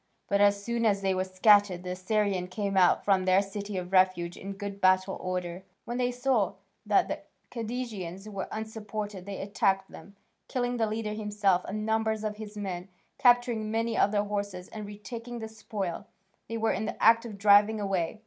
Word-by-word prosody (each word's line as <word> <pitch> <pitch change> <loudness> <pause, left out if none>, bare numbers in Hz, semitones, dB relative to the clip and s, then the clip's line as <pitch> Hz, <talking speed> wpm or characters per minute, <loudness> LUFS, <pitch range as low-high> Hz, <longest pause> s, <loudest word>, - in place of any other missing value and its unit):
But, 200 0 +2
as 200 0 +4
soon 235 +1 -1
as 200 -3 +2
they 190 -1 +2
were 185 0 0
scattered 190 -1 +4
the 180 - -4
Assyrians 185 0 0
came 200 +1 -2
out 185 -2 +4
from 190 -2 +3
their 185 +1 +5
city 200 0 -5
of 180 0 -5
refuge 185 -2 +3
in 195 +1 -7
good 200 0 -7
battle 185 +1 +3
order. 180 -1 -3 0.2
When 240 +1 -3
they 245 0 +2
saw 245 -4 +1 0.3
that - - +4
the - - -3 0.3
Cadousians 215 -6 -5
were 195 -2 -5
unsupported 215 -3 -5
they 200 -1 -5
attacked 195 -1 0
them, 200 +5 -12 0.3
killing 245 -1 -1
the 225 -1 +1
leader 215 0 -3
himself 205 -3 +1
and 215 +2 -4
numbers 220 0 0
of 210 -1 -3
his 215 -1 -8
men, 190 -2 -4 0.3
capturing 240 -3 +3
many 225 +1 0
of 200 - +3
their 205 -1 +2
horses 200 -3 -4
and 215 -2 -7
retaking 230 +4 -7
the 220 -1 -5
spoil 210 -4 -5 0.4
they 230 - -3
were 225 0 +1
in 215 +3 -2
the 225 - -5
act 230 +1 +6
of 220 -4 -8
driving 205 +2 +5
away. 195 -1 -1
205 Hz, 185 wpm, -29 LUFS, 190-220 Hz, 0.4 s, act